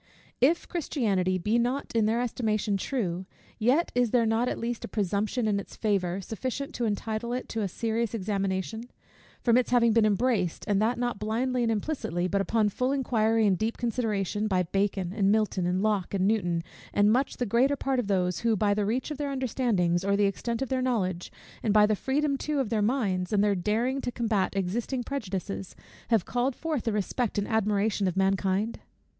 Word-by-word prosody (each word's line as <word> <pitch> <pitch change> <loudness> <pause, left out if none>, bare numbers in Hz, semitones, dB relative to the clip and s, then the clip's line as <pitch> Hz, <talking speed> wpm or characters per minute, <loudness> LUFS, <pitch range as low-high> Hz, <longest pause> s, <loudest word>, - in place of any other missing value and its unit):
If 305 +7 +3
Christianity 200 - 0
be 210 +6 +1
not 250 +4 -1
in 220 -2 +3
their 230 +2 +1
estimation 220 -4 0
true, 190 -5 -2 0.3
yet 260 +10 +2
is 245 -1 +2
there 235 0 +3
not 225 +3 +1
at - - -3
least 235 0 -3
a - - -4
presumption 210 +3 -1
in 205 -1 +1
its 200 - -9
favour, 195 -3 0
sufficient 255 +7 -4
to 240 - -2
entitle 220 +2 -2
it 250 - -3
to 225 - -2
a 200 - 0
serious 225 +3 -2
examination; 195 +2 -2 0.5
from 235 -1 +4
its 250 - +1
having 235 -2 +4
been 225 -1 +4
embraced, 205 -4 0
and 205 -1 +2
that 230 +3 +1
not 240 -3 -2
blindly 245 +4 0
and 230 -1 +2
implicitly, 205 - -2
but 200 +1 +1
upon 215 +1 +2
full 255 +6 -1
inquiry 225 -5 +2
and 190 -3 +2
deep 225 +1 -1
consideration, 215 -3 -1
by 185 -3 +2
Bacon, 190 0 -1
and 200 -2 +3
Milton, 210 -4 +1
and 185 +2 0
Locke, 205 -3 0
and 190 -1 +1
Newton, 175 -6 +1 0.3
and 205 +1 +4
much 265 +3 0
the 245 - -1
greater 245 +6 +3
part 270 -2 -1
of 235 - -2
those, 180 -3 +1
who, 230 -1 +2
by 205 0 +2
the 205 -1 0
reach 250 +7 -1
of 300 - -5
their 290 -1 -1
understandings, 225 -10 0
or 200 +1 +2
the 205 - +3
extent 230 +5 -1
of 270 - -5
their 260 -1 0
knowledge, 190 -9 -1 0.3
and 215 -1 0
by 210 0 +7
the 215 0 +2
freedom 280 +4 0
too 300 -1 -1
of 260 -6 0
their 220 -2 +1
minds, 205 -6 0
and 205 -1 +3
their 205 -1 +3
daring 225 +8 0
to 245 - -3
combat 220 -6 0
existing 225 +7 -1
prejudices, 195 -7 -4 0.3
have 225 -6 +2
called 245 +2 0
forth 310 -7 -3
the 225 - +1
respect 210 +3 -1
and 205 - 0
admiration 210 -2 +1
of 180 0 -2
mankind? 195 +2 +1
220 Hz, 200 wpm, -28 LUFS, 195-245 Hz, 0.5 s, by